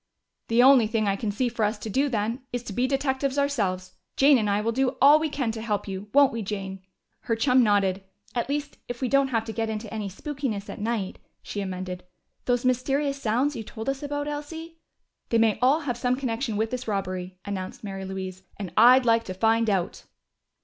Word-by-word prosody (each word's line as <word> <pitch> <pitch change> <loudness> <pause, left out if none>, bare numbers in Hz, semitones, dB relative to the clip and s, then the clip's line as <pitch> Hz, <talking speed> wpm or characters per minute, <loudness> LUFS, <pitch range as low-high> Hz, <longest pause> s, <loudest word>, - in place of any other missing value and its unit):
"The 235 +2 +4
only 260 -4 +7
thing 215 -1 0
I 195 - +2
can 210 +1 -3
see 215 +5 0
for 235 -2 -2
us 210 +1 +1
to 210 - -7
do, 270 +7 +1
then, 230 +2 -1
is 245 -1 -3
to 210 - -7
be 250 +5 +1
detectives 270 0 0
ourselves. 195 -10 0 0.2
Jane 275 -1 +6
and 210 -2 0
I 200 0 +2
will 225 +2 0
do 260 +2 0
all 290 +3 +7
we 315 0 -1
can 265 -6 -1
to 220 0 -6
help 215 -2 -2
you, 195 +1 -6
won't 280 -1 +5
we, 230 - -3
Jane?" 195 -2 -5 0.4
Her 230 - -1
chum 250 +2 +4
nodded. 200 -3 +2 0.3
"At 240 +1 -2
least, 290 0 -3
if 245 -1 -5
we 260 - 0
don't 275 +2 +3
have 225 -4 -1
to 220 - -5
get 225 0 -2
into 215 0 -5
any 210 -2 -3
spookiness 240 -1 -4
at - - -8
night," 215 -4 -2 0.2
she 205 - -4
amended. 185 -1 -5 0.4
"Those 245 0 +1
mysterious 275 +3 0
sounds 250 +7 +1
you - - -4
told 220 +1 -8
us 275 0 -2
about, 290 0 -3
Elsie 325 +3 -6 0.2
" - - -53
"They 230 - +3
may 225 -2 +3
all 275 +6 +4
have 250 -5 -3
some 250 +1 +1
connection 240 -3 -2
with 220 +1 0
this 250 -1 -4
robbery," 185 -3 -3
announced 190 -1 -5
Mary 195 -2 -5
Louise. 190 -1 -6 0.2
"And 190 -5 -6
I'd 250 +3 +7
like 230 -1 +4
to 185 - -5
find 225 +2 +2
out!" 190 -4 -1
230 Hz, 220 wpm, -26 LUFS, 205-265 Hz, 0.4 s, only